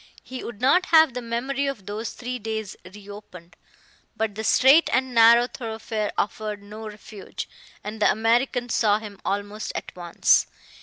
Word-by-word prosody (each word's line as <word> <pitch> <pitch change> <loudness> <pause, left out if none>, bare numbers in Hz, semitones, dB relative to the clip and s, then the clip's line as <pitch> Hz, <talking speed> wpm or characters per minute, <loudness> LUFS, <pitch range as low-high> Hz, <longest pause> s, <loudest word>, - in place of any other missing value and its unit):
He 260 0 -8
would 235 -3 -8
not 355 +9 +3
have 320 -4 +5
the 250 - -4
memory 260 +4 -2
of 265 -9 -5
those 210 +3 -5
three 250 0 -5
days 220 -2 -5 0.2
re 205 0 -14
opened. 180 -4 -12 0.6
But 220 -2 -1
the 220 +2 -5
straight 270 +8 +5
and 260 +1 0
narrow 235 +1 +7
thoroughfare 220 -3 -4
offered 210 0 -3
no 215 +2 -9
refuge, 210 -1 -9 0.4
and 215 +1 -7
the - - +5
American 240 +3 +1
saw 210 -3 +2
him 210 -2 -10
almost 205 +2 -3
at - - -6
once. 175 -2 +2
220 Hz, 160 wpm, -24 LUFS, 205-245 Hz, 0.6 s, narrow